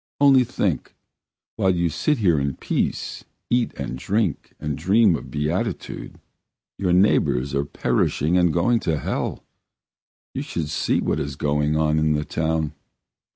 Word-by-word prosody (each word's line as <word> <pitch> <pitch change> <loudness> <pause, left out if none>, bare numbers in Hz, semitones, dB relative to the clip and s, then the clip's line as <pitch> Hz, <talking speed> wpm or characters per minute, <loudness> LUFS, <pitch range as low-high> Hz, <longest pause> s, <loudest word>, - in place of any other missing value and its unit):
Only 135 -2 +6
think, - - -2 0.6
while 95 - +2
you 85 0 +1
sit 150 - 0
here 90 -9 +3
in 70 -1 -1
peace, - - -2 0.3
eat 120 -1 +2
and 65 -2 -5
drink 100 - -1
and 75 -1 -3
dream 95 +4 +4
of - - -7
beatitude, 75 +5 -3 0.6
your 90 -2 +1
neighbours 85 -8 +3
are 70 +1 0
perishing 75 +4 0
and 90 -2 +4
going 95 +9 +2
to 80 -7 -1
hell. - - -3 0.9
You - - -3
should 80 -3 -4
see - - +1
what - - 0
is 70 0 -4
going 75 +2 0
on 75 0 +2
in 75 0 +2
the 75 0 -1
town! 80 -2 -1
80 Hz, 150 wpm, -23 LUFS, 75-95 Hz, 0.9 s, Only